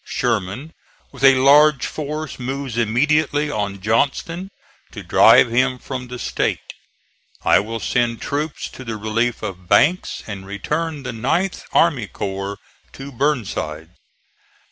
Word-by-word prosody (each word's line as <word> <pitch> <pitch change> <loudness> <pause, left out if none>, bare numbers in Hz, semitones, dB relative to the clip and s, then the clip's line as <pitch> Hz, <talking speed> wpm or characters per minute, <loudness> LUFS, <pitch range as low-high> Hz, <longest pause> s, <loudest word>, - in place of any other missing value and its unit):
Sherman, 125 - -2 0.4
with 135 -1 -11
a 135 -1 +8
large 140 +1 +5
force, 150 -1 -5
moves 135 -1 -4
immediately 145 +6 +1
on 100 -3 -3
Johnston, 140 - -1 0.4
to - - -8
drive 120 - +6
him 130 +2 +2
from 125 0 -6
the 125 0 -7
State. - - -2 0.7
I - - +5
will 115 +3 -4
send 120 0 0
troops 150 +2 -3
to 130 - -10
the 115 -3 -5
relief 110 +3 -1
of 95 -4 -7
Banks, 155 - +2
and 100 -3 -7
return 150 +10 -3
the 125 - -4
9th 150 +12 -1
army 145 -11 +2
corps 100 +1 -5 0.4
to 135 +1 -9
Burnside." 110 - -2
125 Hz, 130 wpm, -20 LUFS, 110-145 Hz, 0.7 s, a